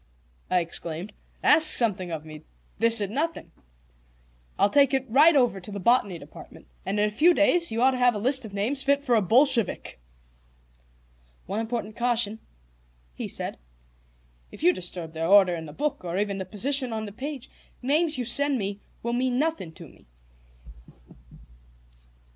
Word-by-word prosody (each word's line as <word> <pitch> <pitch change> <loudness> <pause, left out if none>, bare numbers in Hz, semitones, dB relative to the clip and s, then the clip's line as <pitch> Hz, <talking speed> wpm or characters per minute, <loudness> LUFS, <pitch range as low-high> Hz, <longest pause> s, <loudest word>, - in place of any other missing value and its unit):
I 180 -1 +2
exclaimed. 170 +3 -5 0.3
"Ask 315 +1 +6
something 195 -6 0
of 160 -2 -6
me. 155 -1 -11 0.4
This 230 0 +6
it 200 -1 -3
nothing. 320 +7 -3 1.1
I'll 200 - +2
take 280 -2 +4
it 265 0 -1
right 295 +7 +5
over 245 -7 +2
to 190 +3 -10
the 200 - -6
Botany 205 -3 +2
Department, - - -14 0.2
and 205 - -1
in 210 - +2
a - - -4
few 335 +10 +4
days 335 +1 +2
you 230 +2 -1
ought 265 - +5
to 255 - -4
have 245 -2 +3
a - - -2
list 260 +5 +1
of 220 - -9
names 220 +8 -2
fit 280 +1 +1
for 250 -4 0
a 225 - +4
Bolshevik." 235 - +1 1.5
"One 200 +4 -4
important 225 -2 -4
caution," 235 -3 -1 0.7
he - - -6
said. - - -4 0.9
"If - - -11
you 180 - +5
disturb 175 -2 -5
their 165 0 -3
order 195 -2 +5
in 165 -2 -6
the - - -9
book, 295 - -3
or 175 0 -4
even 200 -1 -2
the 190 - -4
position 255 +7 0
on 220 0 -4
the 205 - -8
page, 265 +3 -7 0.3
the - - -12
names 305 +1 +1
you 250 - -3
send 280 +4 +1
me 200 -2 -4 0.2
will 235 +1 -2
mean 250 0 0
nothing 305 - -2
to 165 -1 -12
me. - - -22
225 Hz, 175 wpm, -25 LUFS, 195-265 Hz, 1.5 s, Ask